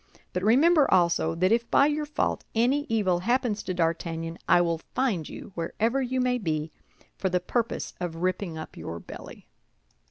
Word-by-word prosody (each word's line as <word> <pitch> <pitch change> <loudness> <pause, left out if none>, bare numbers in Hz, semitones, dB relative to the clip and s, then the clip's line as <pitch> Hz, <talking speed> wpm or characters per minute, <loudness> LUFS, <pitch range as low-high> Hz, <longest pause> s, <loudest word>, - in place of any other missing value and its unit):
But 180 - -1
remember, 280 - +4
also, 170 -3 +3
that 185 +4 +2
if 235 +1 +2
by 280 - +5
your 300 0 0
fault 300 - -1
any 260 +6 +2
evil 200 -6 +2
happens 235 +1 0
to - - -4
D'Artagnan, 165 -1 -2
I - - +7
will 170 -2 +1 0.2
find 215 - 0
you, - - -9
wherever 225 +10 -1
you 260 0 -1
may 250 0 +1
be, 155 -5 -2 0.5
for 190 - 0
the 180 0 +1
purpose 235 +4 -2
of 175 -2 -3
ripping 180 0 -2
up 155 - -8
your 85 - -6
belly." - - -11
190 Hz, 170 wpm, -27 LUFS, 170-250 Hz, 0.5 s, I